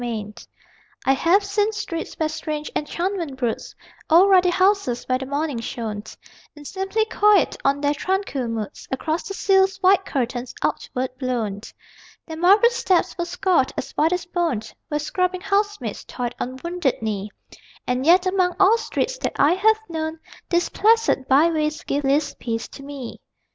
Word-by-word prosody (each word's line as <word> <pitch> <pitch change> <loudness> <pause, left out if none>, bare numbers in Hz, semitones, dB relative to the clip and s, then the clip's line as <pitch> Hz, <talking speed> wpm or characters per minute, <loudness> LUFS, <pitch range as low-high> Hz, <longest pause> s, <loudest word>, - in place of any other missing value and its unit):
STREETS 215 -3 -6 0.6
I 270 - +5
have 345 +9 +3
seen 410 +1 0
streets 335 -6 -5
where 315 - +1
strange 310 -1 -4
enchantment 335 -1 -2
broods: 240 -4 -3 0.3
Old 365 +5 +6
ruddy 365 -1 +6
houses 370 -9 +2
where 255 0 0
the 265 - -6
morning 285 -2 -2
shone 225 -3 -4 0.5
In 295 -1 -13
seemly 385 +6 -1
quiet 420 -2 +3
on 280 +1 +1
their 290 0 +2
tranquil 335 -5 -2
moods, 225 -3 -5
Across 315 +5 -2
the 390 - -5
sills 385 -1 +3
white 380 0 +4
curtains 245 -4 -3
outward 255 0 -2
blown. 230 -6 -2 0.6
Their 320 - -7
marble 400 +8 +5
steps 380 -7 +1
were 345 - -2
scoured 345 -5 +1
as - - -4
white 315 +2 +1
as 360 0 -1
bone 345 - -1 0.3
Where 295 - -1
scrubbing 365 +4 -1
housemaids 410 +1 -1
toiled 245 -1 -4
on 255 +1 -4
wounded 340 -5 -1
knee 210 -2 -3 0.6
And 250 +1 -1
yet, 355 +5 +5
among 370 -1 +1
all 405 +4 +5
streets - - -2
that - - -2
I 295 +4 +4
have 435 +4 +3
known 320 -1 -4 0.3
These 345 0 +1
placid 450 - +2
byways 305 +2 +2
give 285 +1 -2
least 285 +2 +1
peace 230 -1 -3
to - - -11
me. 275 -4 -8
320 Hz, 160 wpm, -22 LUFS, 265-380 Hz, 0.6 s, Old